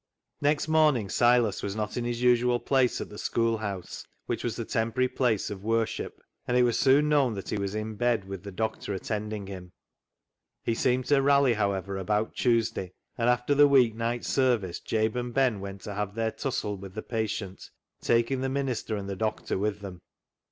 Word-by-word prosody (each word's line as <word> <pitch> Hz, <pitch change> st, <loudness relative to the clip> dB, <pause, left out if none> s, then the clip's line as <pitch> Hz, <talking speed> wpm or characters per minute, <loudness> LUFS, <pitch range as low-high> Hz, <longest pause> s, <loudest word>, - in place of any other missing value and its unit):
Next 150 Hz, +1 st, +1 dB
morning 150 Hz, -10 st, +3 dB
Silas 120 Hz, -3 st, +3 dB
was 100 Hz, 0 st, -3 dB
not 105 Hz, -1 st, -3 dB
in 120 Hz, -, -2 dB
his 120 Hz, 0 st, -2 dB
usual 125 Hz, 0 st, +4 dB
place 130 Hz, -2 st, +2 dB
at -, -, -6 dB
the 105 Hz, -, -9 dB
schoolhouse, 110 Hz, -5 st, -2 dB, 0.2 s
which -, -, -3 dB
was -, -, -2 dB
the -, -, -4 dB
temporary 115 Hz, +3 st, 0 dB
place 120 Hz, -6 st, 0 dB
of 100 Hz, -1 st, -7 dB
worship, 115 Hz, 0 st, -1 dB, 0.3 s
and 125 Hz, -, +2 dB
it 125 Hz, -, +5 dB
was 120 Hz, -2 st, +2 dB
soon 140 Hz, +2 st, +5 dB
known 140 Hz, -6 st, +3 dB
that 95 Hz, -, -6 dB
he 105 Hz, -, -1 dB
was 100 Hz, +1 st, -3 dB
in 110 Hz, 0 st, -3 dB
bed, 120 Hz, -4 st, +1 dB
with 95 Hz, -1 st, -7 dB
the 100 Hz, -, -8 dB
doctor 105 Hz, 0 st, -3 dB
attending 105 Hz, +1 st, -4 dB
him. 90 Hz, -2 st, -9 dB, 0.9 s
He 115 Hz, -, 0 dB
seemed 125 Hz, +2 st, +1 dB
to 145 Hz, -2 st, +3 dB
rally, 140 Hz, -2 st, +4 dB
however, 100 Hz, -2 st, -1 dB
about 105 Hz, +3 st, -1 dB
Tuesday, 115 Hz, -6 st, 0 dB, 0.2 s
and 120 Hz, 0 st, +1 dB
after 125 Hz, +3 st, +2 dB
the 145 Hz, +1 st, +7 dB
week 130 Hz, -5 st, +5 dB
night 115 Hz, +1 st, -2 dB
service 120 Hz, -10 st, +1 dB
Jabe 110 Hz, +1 st, 0 dB
and 120 Hz, -1 st, -5 dB
Ben 130 Hz, -6 st, +2 dB
went 100 Hz, 0 st, -7 dB
to 105 Hz, -, -6 dB
have 105 Hz, 0 st, -3 dB
their 115 Hz, -1 st, 0 dB
tussle 110 Hz, -7 st, -3 dB
with 95 Hz, 0 st, -10 dB
the 110 Hz, -, -4 dB
patient, 110 Hz, -4 st, -4 dB, 0.3 s
taking 120 Hz, +3 st, +1 dB
the 135 Hz, -, -1 dB
minister 130 Hz, -5 st, -2 dB
and 100 Hz, -1 st, -5 dB
the 100 Hz, -, -3 dB
doctor 110 Hz, +2 st, -2 dB
with 105 Hz, 0 st, -1 dB
them. 95 Hz, -3 st, -8 dB
115 Hz, 195 wpm, -28 LUFS, 100-125 Hz, 0.9 s, the